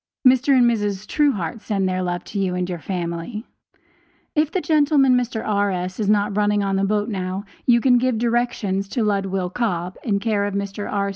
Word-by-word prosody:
Mr. 260 +2 +5
and 245 - +5
Mrs. 205 -4 0
Truehart 220 - 0
send 195 -3 -1
their 185 0 -1
love 175 -1 -2
to 205 - -5
you 185 -2 0
and 180 0 -1
your 175 -2 -4
family. 175 - -4 0.9
If 305 -1 +1
the 375 - 0
gentleman, 290 -5 +3
Mr. 245 -2 -1
R.S., 195 -3 -1
is 205 -2 0
not 205 -1 +2
running 205 0 +2
on 195 -1 0
the 195 - +1
boat 210 +1 0
now, 190 -2 -3 0.2
you 240 -1 +6
can 250 -1 +4
give 255 -2 +1
directions 230 -5 -1
to 235 - -1
Ludwill 195 -3 -1
Cobb, 180 -6 -2
in 205 -4 +1
care 205 -1 0
of 205 -1 -3
Mr. 200 +1 -4
R. 200 -1 0
205 Hz, 195 wpm, -22 LUFS, 190-235 Hz, 0.9 s, you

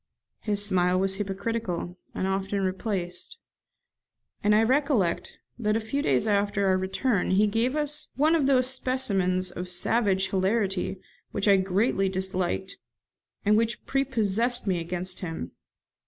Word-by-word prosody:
His 205 -1 0
smile 185 -2 +2
was 190 0 +1
hypocritical, 200 -2 -3 0.2
and - - -1
often 195 +1 -1
misplaced; 185 - -3 1.1
and 210 +1 +4
I 220 - +5
recollect 255 - +1 0.2
that 215 -2 +1
a - - +2
few 225 +6 -2
days 130 - +2
after 200 -1 +1
our 190 -1 +3
return 195 +2 0
he 195 +3 +4
gave 225 +6 0
us 300 0 -1
one 305 +4 +3
of 305 -5 +2
these 255 -2 +4
specimens 200 -9 0
of 180 +1 -6
savage 190 +1 +2
hilarity 195 -1 0 0.3
which 205 +1 -2
I 200 -1 +6
greatly 195 +1 +1
disliked, 190 0 -2 0.7
and 210 +1 +5
which 230 +1 0
prepossessed 245 -3 0
me 185 -4 0
against 180 +2 -4
him. 165 - -5
200 Hz, 140 wpm, -26 LUFS, 185-230 Hz, 1.1 s, I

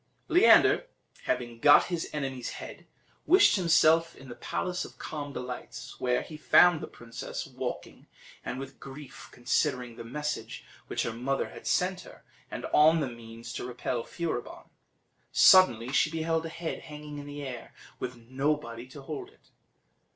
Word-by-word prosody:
Leander 390 +6 +6 0.4
having 120 -2 -2
got 145 +2 +7
his 175 -2 -3
enemy's 135 -4 -4
head, - - -10 0.4
wished 380 +3 +6
himself 165 -2 +4
in 135 0 -13
the 120 - -8
Palace 180 +8 -3
of - - -11
Calm 145 -2 -6
Delights, 125 -1 -7
where 125 -1 +1
he 155 - -10
found 175 +1 +5
the - - -5
princess 115 -1 -7
walking, - - -6 0.4
and 125 - -4
with 135 0 -9
grief 135 0 -11
considering 125 -1 -1
the - - -7
message 150 +5 -5 0.2
which - - -1
her 115 - -3
mother 135 +4 -2
had - - -10
sent 185 0 +1
her, - - -15 0.3
and - - -6
on 160 +2 +6
the 135 -5 -2
means 115 0 -10
to - - -5
repel 125 0 -3
Furibon. 165 -8 -5 0.6
Suddenly 125 -10 +6
she 140 +4 +3
beheld 165 0 -1
a - - -7
head 165 0 -5
hanging 150 -1 -9
in 145 - -9
the 145 0 -7
air, 130 -3 -7 0.3
with 125 - -4
nobody 125 0 -3
to 135 +1 -12
hold 380 - -6
it. 430 - -27
145 Hz, 160 wpm, -29 LUFS, 125-160 Hz, 0.6 s, got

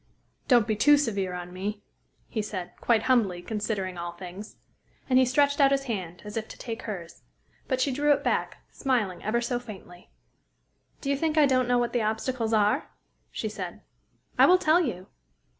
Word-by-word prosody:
"Don't 240 -4 +5
be 215 - 0
too 295 +8 +6
severe 200 -9 -1
on 180 0 -7
me," 205 +3 -4 0.4
he 220 - -2
said 185 -4 -5
quite 225 -2 +3
humbly, 225 -9 +2
considering 205 -4 -3
all 170 0 -5
things. 185 +4 -9 0.5
And 255 -1 +4
he 260 - +5
stretched 285 +3 +2
out 275 - +7
his 275 0 +1
hand, 185 -9 -5
as 210 - -7
if 220 -1 -3
to - - -11
take 230 -1 -6
hers. 180 -6 -7 0.5
But 260 - 0
she 275 - +2
drew 290 +3 +2
it 285 - +2
back, - - -1
smiling 220 -10 -1
ever 235 +3 0
so 240 0 -1
faintly. 190 -6 -12 0.9
"Do 275 - -1
you - - +2
think 315 +2 -1
I 300 - +7
don't 255 -2 +2
know 245 0 +3
what 240 -1 0
the 240 - +1
obstacles 220 +2 -1
are?" 210 -1 +2 0.4
she - - -4
said. - - -6 0.6
"I - - +8
will 365 - +7
tell 345 -1 +4
you." 195 - -3
225 Hz, 190 wpm, -27 LUFS, 195-260 Hz, 0.9 s, I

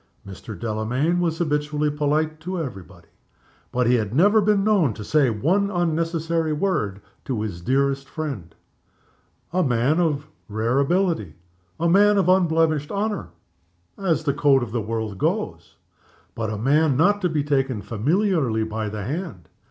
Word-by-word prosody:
Mr. 100 0 -9
Delamayn 120 +10 0
was 165 -2 0
habitually 150 -2 0
polite 150 +1 0
to 180 +2 -4
every 125 -11 -5
body 90 - -18 0.6
but 125 0 +1
he 120 - +3
had 110 -2 0
never 205 +7 +5
been 205 -1 +2
known 190 - +2
to 105 - -7
say 145 +3 +2
one 170 - +1
unnecessary 165 -2 0
word 150 - -1 0.2
to 115 -5 -2
his 90 -5 -5
dearest 135 +5 0
friend. 135 - -6 1.0
A 185 - +2
man 130 +2 +2
of 155 -4 0 0.2
rare 115 +5 0
ability; 160 - 0 0.4
a 170 - +1
man 205 +4 +5
of 190 -2 +2
unblemished 160 -5 +2
honor 205 - -2 0.7
(as 170 -5 0
the 140 -3 +1
code 140 -2 +3
of 115 - -6
the 115 0 -1
world 110 -2 -4
goes); - - -2 0.6
but 115 -1 -3
not 110 - -3
a - - -5
man 155 - +3
to 180 -3 0
be 155 -3 0
taken 135 -6 0
familiarly 140 - +1
by 110 0 -3
the 105 -1 -5
hand. 140 - -5
150 Hz, 155 wpm, -23 LUFS, 115-170 Hz, 1.0 s, never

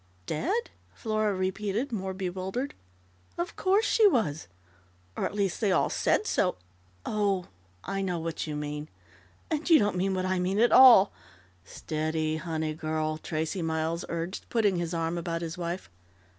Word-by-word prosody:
"Dead?" 385 - -1 0.2
Flora 215 -2 0
repeated, 200 +7 -2
more 190 -4 -3
bewildered. 190 +8 -3 0.6
"Of 345 0 -3
course 395 +4 +2
she 440 -2 +5
was, 160 - 0 0.7
or - - -1
at - - -8
least, 200 -1 -1
they 205 -3 +2
all - - +2
said 430 - +1
so. 185 - +1 0.5
Oh, 200 -4 0 0.3
I 195 0 -3
know 180 -3 -1
what 165 0 -4
you 150 - -3
mean! 150 +1 -5 0.6
And 315 +2 -1
you 325 - +8
don't 205 -5 +1
mean 190 +1 0
what 185 0 -1
I 185 0 0
mean 185 +2 0
at 235 +2 +4
all 240 -7 +9 0.3
" 90 -1 -31
"Steady, 155 +7 -2
honey 160 -1 -3
girl!" 155 0 -2
Tracey 160 +4 -3
Miles 160 +1 -1
urged, 170 +3 -4
putting 210 -6 +2
his 170 0 -2
arm 165 +1 -1
about 165 0 -3
his 165 0 -4
wife. 175 0 -4
185 Hz, 160 wpm, -28 LUFS, 160-210 Hz, 0.7 s, all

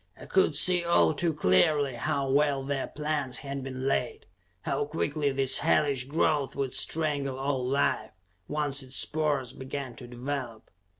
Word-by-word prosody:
I - - -10
could 190 -5 +2
see 180 +3 +4
all 170 -2 +3
too 165 +3 +1
clearly 145 - +3
how 140 +3 -1
well 140 0 +2
their 135 0 -2
plans 150 -4 -2
had 140 -1 -5
been 130 0 -5
laid; 125 -2 -1 0.4
how 140 +7 -1
quickly 145 -1 -1
this 135 -1 +2
hellish 145 -4 +2
growth 145 -1 0
would 135 -2 -2
strangle 145 -4 0
all 135 -1 -1
life, 135 +3 0 0.4
once 145 -2 -1
its 130 0 -2
spores 145 -5 0
began 130 -1 -6
to 125 - -10
develop. 125 -2 -5
140 Hz, 155 wpm, -28 LUFS, 130-150 Hz, 0.4 s, see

